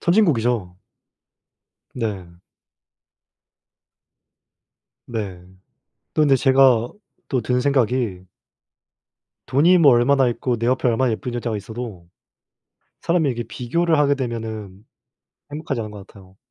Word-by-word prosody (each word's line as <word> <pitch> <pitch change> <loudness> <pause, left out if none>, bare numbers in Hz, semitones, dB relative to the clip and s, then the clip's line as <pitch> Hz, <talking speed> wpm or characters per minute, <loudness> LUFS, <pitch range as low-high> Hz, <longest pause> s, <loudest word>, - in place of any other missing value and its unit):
선진국이죠. 120 - +1 1.1
네. 95 -7 -5 2.7
네. 100 -6 -5 0.7
또 - - +1
근데 145 -3 +5
제가 130 -3 +4 0.4
또 130 -3 0
든 125 +1 0
생각이 125 -8 0 1.2
돈이 165 +7 +4
뭐 145 -5 +6
얼마나 130 +2 +3
있고 120 +1 -2
내 115 - -2
옆에 130 0 +1
얼마나 120 +2 +1
예쁜 125 +2 -5
여자가 120 -2 -3
있어도 110 -5 -8 0.9
사람이 165 -3 +1
이렇게 120 -2 -3
비교를 160 +8 0
하게 145 -1 +3
되면은 110 -6 -6 0.7
행복하지 145 -5 -4
않은 105 - -7
것 100 -2 -11
같아요. 95 -1 -18
120 Hz, 230 characters per minute, -21 LUFS, 110-135 Hz, 2.7 s, 뭐